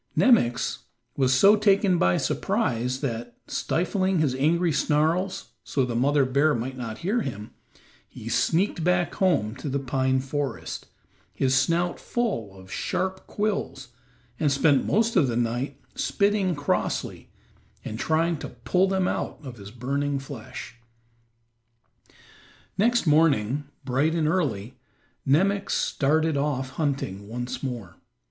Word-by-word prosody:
Nemox 215 - +3 0.4
was 130 -2 +2
so 195 +11 +6
taken 200 -3 +3
by 90 0 +3
surprise 125 +2 -1
that, 120 -3 -4
stifling 185 +2 0
his 150 -5 +2
angry 165 +6 +2
snarls 165 +7 0
so 135 -3 0
the 120 -2 -4
mother 140 +3 +3
bear 140 +4 +2
might 125 +3 -3
not 115 -3 -5
hear 225 +6 +1
him, 105 - -6 0.6
he - - -10
sneaked 175 0 +1
back 175 0 +1
home 165 - +1
to 145 - -5
the 140 - 0
pine 130 -1 0
forest, 135 -1 -4 0.5
his 130 -1 +1
snout 170 +6 +1
full 115 - -2
of 95 0 -14
sharp 190 0 -2
quills, 205 - -2 0.5
and 150 -3 +2
spent 140 0 +3
most 225 +2 +2
of 165 -8 +4
the 120 -2 -1
night 120 +4 -2
spitting 200 -3 +1
crossly 145 0 -2 0.6
and 110 - -5
trying 165 +1 +1
to - - -7
pull 185 +1 +1
them 190 -1 +1
out - - -2
of 130 -4 -8
his 100 -1 -10
burning 140 +5 -2
flesh. 135 -3 -8 2.0
Next 235 +3 +2
morning, 145 -4 +3 0.2
bright 140 +6 +1
and 160 -2 +1
early, 130 - -1 0.5
Nemox 195 +8 +2
started 155 +2 +1
off 140 -2 -1
hunting 130 - -2
once 120 +3 -5
more. 120 -10 -5
145 Hz, 130 wpm, -25 LUFS, 125-175 Hz, 2.0 s, so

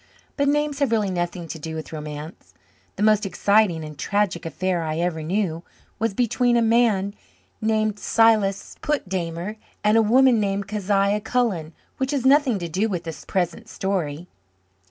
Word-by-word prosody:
But 285 -1 +1
names 295 0 +1
have 280 - +2
really 210 -4 +1
nothing 175 -1 -3
to 160 - -7
do 160 +1 -6
with 160 0 -7
romance. 150 +1 -8 0.4
The - - -2
most 215 0 +4
exciting 195 -3 +2
and 150 0 -9
tragic 200 -5 0
affair 180 +2 -1
I 155 -1 -2
ever 170 -1 -1
knew 170 0 -1 0.4
was 225 -2 -1
between 245 +1 +2
a - - +3
man 220 -4 +2 0.5
named 215 -1 0
Silas 215 -4 +2
Putdammer 185 - -2 0.3
and 210 +1 +4
a - - +6
woman 245 +2 +5
named 200 -1 -1
Kezia 205 0 +1
Cullen 200 -11 -1 0.2
which 265 0 -1
has 265 -3 -1
nothing 270 -4 +4
to 175 -2 -4
do 190 +7 0
with 180 -4 -3
the 165 - -5
present 185 +5 -2
story. 180 -6 -3
200 Hz, 160 wpm, -23 LUFS, 170-225 Hz, 0.5 s, a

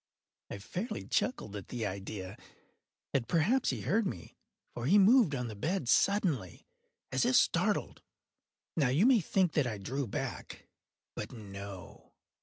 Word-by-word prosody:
I - - -5
fairly 180 - -5
chuckled 110 - -1
at 100 -3 -7
the 120 -3 -4
idea; 95 0 -5 0.8
and 125 -4 0
perhaps 210 +11 +2
he - - -2
heard 220 -1 +1
me; 85 - -7 0.4
for 120 +1 -4
he 195 +7 +6
moved 205 - +5
on 125 -2 -3
the 110 - -6
bed 155 - -2
suddenly, 155 - +1 0.5
as - - +1
if - - +2
startled. - - +2 0.7
Now 140 -6 +2
you 150 - +3
may 255 -3 +6
think 185 -1 +1
that 145 -5 +2
I 110 -3 -3
drew 130 +7 -3
back—but 100 - -8
no. 100 -4 -10
130 Hz, 145 wpm, -32 LUFS, -, 0.8 s, he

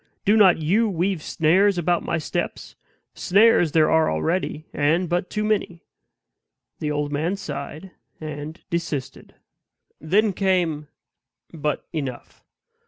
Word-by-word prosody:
Do 205 - +4
not 195 -5 +6
you 195 +9 +1
weave 185 -1 -1
snares 185 +6 +2
about 175 0 +1
my - - -2
steps; 155 - -4 0.4
snares 200 -5 +3
there 155 -1 +4
are 160 0 +3
already, 155 - -2
and 160 +5 +1
but 175 +2 -1
too 210 - -2
many." 200 -5 -1 1.0
The 150 - -2
old 145 0 -2
man 160 +6 -1
sighed, 150 +1 -7 0.3
and 155 0 -7
desisted. 165 -6 -4 0.6
Then 200 +6 +2
came 175 -6 0 0.7
But 150 -2 -3
enough! 135 -6 -6
165 Hz, 120 wpm, -23 LUFS, 150-190 Hz, 1.0 s, not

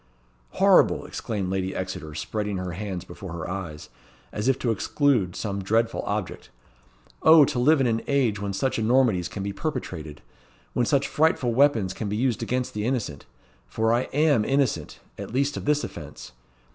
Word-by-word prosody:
"Horrible!" - - +4
exclaimed 100 -4 -4
Lady 95 0 -2
Exeter 85 -5 -5
spreading 105 +3 -3
her 90 -1 -4
hands 95 0 -5
before 85 0 -9
her 85 -2 -5
eyes, 85 -5 -6 0.4
as 105 +3 -3
if 135 -1 +3
to 120 - 0
exclude 115 - +1
some 100 -2 -3
dreadful 115 +4 +1
object. - - -4 0.7
"O 160 -2 +8
to 135 -3 -2
live 150 +5 +4
in 135 - +2
an 115 -1 +1
age 125 -8 +1
when 100 -1 -2
such 125 +6 -1
enormities 110 -6 +2
can 100 - -6
be 100 0 -3
perpetrated! 90 - -5 0.5
when 120 -2 +1
such 140 -1 +2
frightful 145 -6 +1
weapons 115 -8 +3
can 105 - -4
be 105 - -2
used 125 -1 0
against 125 0 -2
the 105 - -3
innocent 110 - -3 0.4
for 110 - +1
I 120 +2 +1
am 145 -5 +3
innocent, 130 - 0 0.2
at - - -6
least 140 +3 0
of - - -5
this 150 0 +2
offence. - - -8
110 Hz, 170 wpm, -25 LUFS, 95-130 Hz, 0.7 s, O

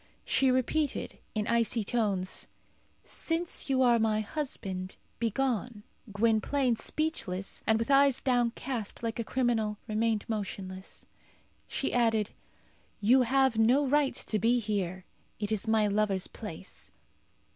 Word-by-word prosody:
She 270 - +3
repeated, 260 +3 0 0.2
in 210 -1 0
icy 230 0 +1
tones, 200 -4 -1 0.6
"Since 330 -2 -2
you 260 -1 +3
are 240 -2 +5
my 215 -1 +2
husband, 195 -7 -4 0.2
begone." 235 -2 -1 0.3
Gwynplaine, 230 +4 +2
speechless, 220 - -2
and 220 - +4
with 230 +4 -1
eyes 275 -1 +5
downcast 245 -3 -1
like 230 +1 -2
a - - 0
criminal, 225 -4 0
remained 220 -1 0
motionless. 190 -3 -5 0.6
She - - -2
added, 225 -4 +2 0.7
"You 240 +5 +5
have 260 -1 +3
no 250 +6 +4
right 285 0 +2
to 215 - -2
be 235 +5 +3
here; 190 -5 -2 0.3
it 210 0 -2
is 215 0 0
my 220 -1 +3
lover's 205 -2 +1
place." 190 -4 -7
225 Hz, 125 wpm, -30 LUFS, 210-255 Hz, 0.7 s, are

